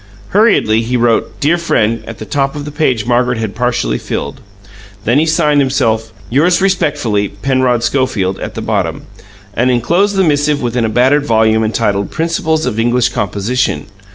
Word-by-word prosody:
Hurriedly 195 - +3
he 125 +2 -1
wrote 115 -1 0
"Dear 155 +3 +2
freind" 115 -9 0
at 115 - -7
the 110 - -8
top 135 +6 -1
of 145 -1 -5
the 150 - -6
page 130 -8 0
Margaret 125 0 +1
had 110 -3 -3
partially 120 - -1
filled. 70 - -5 0.6
Then 120 +6 +3
he 160 - +1
signed 150 -3 +2
himself 115 -5 0 0.2
"Yours 160 +8 +3
respectfuly, 145 - 0 0.2
Penrod 130 -3 +1
Schofield" 110 -10 0
at - - -6
the - - -4
bottom, - - -2 0.5
and 120 +5 +1
enclosed 170 - +1
the 190 - +3
missive 145 -2 +1
within 120 -2 -1
a - - 0
battered 130 +6 +2
volume 110 -1 +3
entitled, 105 -2 -1
"Principles 160 -1 -1
of 115 -3 -2
English 120 +1 +2
Composition." 100 - -2
125 Hz, 165 wpm, -14 LUFS, 110-145 Hz, 0.6 s, Hurriedly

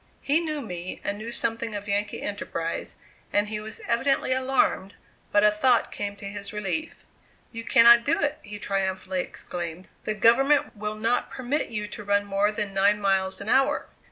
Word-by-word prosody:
He 290 +3 +4
knew 310 -3 -3
me, 180 -6 -6
and 205 +1 -2
knew 225 +2 -6
something 230 -1 -1
of 205 0 -6
Yankee 205 +1 -1
enterprise, 170 -5 -4 0.4
and 205 0 +1
he 215 -1 -3
was 220 +1 -8
evidently 260 +2 +2
alarmed, 260 -6 +1 0.4
but 205 - +4
a 210 - +6
thought 240 +3 +2
came 200 0 -4
to 200 - -10
his 200 0 -6
relief: 210 +10 -3 0.5
"You 230 -1 -6
cannot 235 +2 +7
do 315 +6 +1
it," 285 0 0
he 210 -1 -8
triumphantly 190 -2 -1
exclaimed; 175 0 -7 0.2
"the 215 - -1
government 270 +7 +4
will 210 0 -4
not 225 +3 0
permit 265 +4 -2
you 210 -2 -3
to 210 - -8
run 205 0 +1
more 200 +1 +1
than 210 -2 -3
nine 200 +2 +3
miles 195 -1 +1
an 200 - -8
hour." 270 +5 +2
210 Hz, 180 wpm, -26 LUFS, 200-235 Hz, 0.5 s, cannot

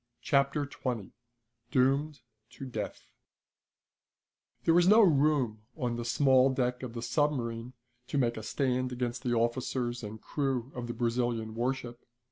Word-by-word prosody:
Chapter 140 +1 +2
Twenty 125 -7 -4 0.6
Doomed 140 +4 +1 0.3
to 135 - -8
Death 110 -5 -5 1.6
There 165 - +4
was 175 +1 +5
no 215 +4 +8
room 140 - +3 0.2
on 125 -5 -1
the 120 0 -4
small 130 +1 +4
deck 125 -1 -1
of 125 -3 -6
the 115 - -4
submarine 120 -2 -1 0.3
to - - -2
make 120 -3 +2
a 110 - -5
stand 130 +2 -1
against 125 -1 -3
the 120 -2 0
officers 120 +1 -1
and 110 0 -7
crew 135 -2 -2
of 120 -1 -5
the 120 - -5
Brazilian 115 -2 -1
warship. 120 0 -3
125 Hz, 140 wpm, -30 LUFS, 120-135 Hz, 1.6 s, no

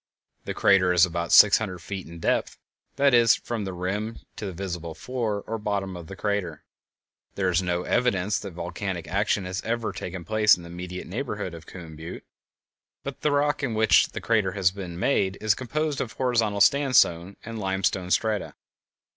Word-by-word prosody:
The - - -4
crater 95 -3 +4
is 90 0 +6
about 85 -1 -3
six 105 - +8
hundred 95 -5 -4
feet 95 +1 -7
in 85 +1 -10
depth—that 140 +10 -1
is, 120 -2 +6
from 115 -4 -4
the 95 - -4
rim 100 +5 -3 0.2
to 105 - -5
the - - -4
visible 85 -3 -5
floor 115 -5 -3
or 115 0 -4
bottom 100 -3 -2
of 85 -2 -9
the 95 - -8
crater. 100 -7 -2 0.7
There 95 -2 +1
is 90 0 +2
no 90 -1 -1
evidence 105 -5 +1
that 100 -3 -8
volcanic 85 0 -4
action 100 0 0
has 90 +1 -3
ever 115 0 -2
taken 90 -1 -6
place 110 -2 +4
in 85 - -11
the 85 - -10
immediate 90 +1 -7
neighborhood 105 -3 -4
of 80 -1 -11
Coon 85 -4 -10
Butte. 80 +2 -8 0.8
The 140 +2 -2
rock 145 +1 +1
in 125 -6 -1
which 110 0 +5
the - - -7
crater 110 -5 +1
has 95 -3 +2
been 90 -3 -7
made 95 -2 +1
is 110 -1 +3
composed 145 +5 -2
of 115 - -4
horizontal 115 -6 0
sandstone 100 -9 +3
and 115 0 -6
limestone 95 -2 -1
strata. 110 +2 0
100 Hz, 180 wpm, -25 LUFS, 90-110 Hz, 0.8 s, six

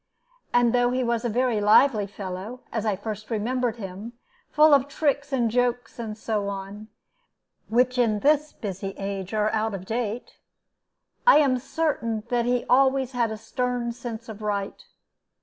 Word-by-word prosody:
And 245 -1 +3
though 245 0 +3
he 255 +1 0
was 235 -1 0
a 240 - 0
very 240 -1 +1
lively 210 0 +5
fellow, 200 +5 -7
as 225 -1 -2
I 210 - +1
first 215 +1 -6
remember 240 +2 0
him, 210 +1 -8 0.4
full 305 0 +5
of 275 -1 +4
tricks 285 -1 -1
and 240 -4 +1
jokes, 245 0 -1
and 215 -2 -5
so 215 -2 -2
on, 200 +2 -7 0.8
which 250 +2 +2
in 215 -4 +2
this 300 +1 +3
busy 195 -1 -6
age 195 -1 -4
are 215 0 +1
out 220 -1 -1
of 190 -1 -8
date, 230 +1 -4 0.9
I - - +9
am 270 -4 +3
certain 240 -6 -2
that 240 -1 +1
he 245 0 0
always 265 0 +3
had 240 -3 0
a 220 - -5
stern 245 +2 -2
sense 230 -1 -7
of 220 -1 -9
right. 205 -2 -3
230 Hz, 165 wpm, -25 LUFS, 210-250 Hz, 0.9 s, I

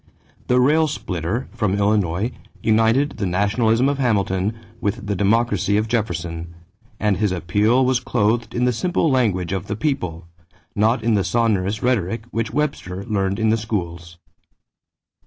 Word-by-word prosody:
The 125 0 +3
"rail 155 +5 +4
splitter" 95 - -3
from 100 -3 0
Illinois 100 0 +1 0.3
united 115 +6 +2
the 100 - -1
nationalism 110 +6 +2
of 140 0 -1
Hamilton 105 -3 0 0.2
with 105 +2 -2
the 100 -1 -1
democracy 100 0 +2
of 110 +1 0
Jefferson, 85 -7 -3 0.4
and 105 -2 +1
his 105 -2 +1
appeal 105 +8 +2
was 130 -1 +2
clothed 115 0 0
in 125 +1 +1
the 125 - +2
simple 170 +3 0
language 100 -9 +1
of 95 -2 -3
the 105 - -2
people, 90 - -2 0.5
not 110 +3 +2
in 115 0 +2
the 100 -2 +2
sonorous 105 -3 0
rhetoric 115 -3 0
which 115 0 -1
Webster 100 -11 -2
learned 100 -3 -1
in 110 0 +1
the 115 - +2
schools. 85 -6 -4
105 Hz, 150 wpm, -21 LUFS, 95-120 Hz, 0.5 s, rail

